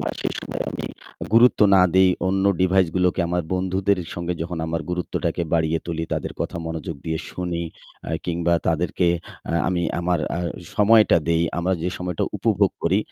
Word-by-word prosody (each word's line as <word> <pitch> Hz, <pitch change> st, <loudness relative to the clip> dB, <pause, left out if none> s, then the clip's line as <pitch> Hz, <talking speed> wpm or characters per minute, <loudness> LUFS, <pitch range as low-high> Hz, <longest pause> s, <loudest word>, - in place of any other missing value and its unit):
বা -, -, -1 dB
সে -, -, 0 dB
সময়ে -, -, -4 dB
আমি -, -, -5 dB, 0.5 s
গুরুত্ব 120 Hz, 0 st, +6 dB
না 95 Hz, -, +7 dB
দেই 95 Hz, 0 st, +6 dB, 0.2 s
অন্য 95 Hz, +1 st, +1 dB, 0.2 s
device 95 Hz, -2 st, +3 dB
গুলোকে, 90 Hz, 0 st, +2 dB
আমার 90 Hz, 0 st, 0 dB
বন্ধুদের 95 Hz, +1 st, +1 dB, 0.2 s
সঙ্গে 85 Hz, 0 st, -3 dB
যখন 85 Hz, 0 st, -5 dB
আমার 80 Hz, 0 st, -2 dB
গুরুত্বটাকে 90 Hz, 0 st, -2 dB
বাড়িয়ে 80 Hz, 0 st, +2 dB
তুলি, 80 Hz, -1 st, -3 dB
তাদের -, -, -2 dB
কথা -, -, -3 dB
মনোযোগ 80 Hz, -1 st, -5 dB
দিয়ে 80 Hz, -1 st, -1 dB
শুনি 90 Hz, -2 st, -3 dB, 0.5 s
আ -, -, -4 dB, 0.2 s
কিংবা 85 Hz, 0 st, +1 dB
তাদেরকে 85 Hz, +2 st, +1 dB, 0.4 s
আ -, -, -2 dB, 0.2 s
আমি 90 Hz, -2 st, 0 dB, 0.2 s
আমার 90 Hz, -1 st, +1 dB, 0.2 s
আ -, -, -2 dB, 0.4 s
সময়টা 105 Hz, -2 st, +6 dB
দেই, 85 Hz, 0 st, +3 dB, 0.2 s
আমরা 90 Hz, +2 st, 0 dB
যে 90 Hz, -, 0 dB
সময়টা 90 Hz, -2 st, -2 dB
উপভোগ 100 Hz, -2 st, +2 dB
করি 95 Hz, +4 st, +3 dB
90 Hz, 170 wpm, -23 LUFS, 85-95 Hz, 0.5 s, না